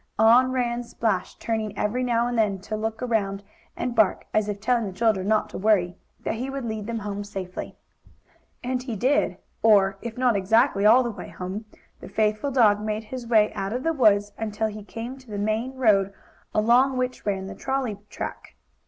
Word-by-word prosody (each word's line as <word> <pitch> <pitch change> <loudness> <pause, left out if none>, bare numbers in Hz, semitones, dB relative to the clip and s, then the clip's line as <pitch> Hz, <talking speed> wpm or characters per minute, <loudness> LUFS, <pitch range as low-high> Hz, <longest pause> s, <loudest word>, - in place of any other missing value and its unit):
On 240 +4 +6
ran 245 -2 0
Splash, 220 -5 -2
turning 215 -3 -3
every 240 +5 0
now 235 -1 +1
and 245 0 -2
then 210 -4 +2
to 215 +2 -4
look 220 +2 -3
around 200 -5 -1 0.3
and 245 0 -2
bark, 220 -5 +2
as 215 -1 +1
if 205 -1 -3
telling 230 +1 +1
the - - -5
children 200 -2 +1
not 215 0 +2
to - - -6
worry 190 -4 +2 0.3
that - - -2
he 250 +4 -4
would 270 -2 -4
lead 220 -2 -4
them 205 -3 -4
safely 190 -3 -6
home. - - -16 1.0
And 255 -1 0
he 250 -3 -5
did, 265 +8 +1 0.2
or, 195 -3 +4
if 235 -1 -6
not 250 -3 +3
exactly 200 +1 +3
all 245 +4 +7
the 240 - -2
way - - -9
home, 190 +4 -6 0.3
the - - -10
faithful 215 +5 0
dog 220 -6 +4
made 215 0 -2
his 240 +2 -7
way 215 -2 +4
out 195 +2 -3
of 250 +2 -3
the 325 - +1
woods, 205 -7 +3
until 220 0 -1
he 210 0 -8
came 235 +5 -7
to 255 -3 -18
the 205 - -5
main 220 +5 -1
road, 205 -6 +3 0.4
along 245 +5 +3
which 255 0 -2
ran 195 -2 -2
the - - -6
trolley 260 -7 -2
track. - - -7
220 Hz, 195 wpm, -25 LUFS, 205-245 Hz, 1.0 s, all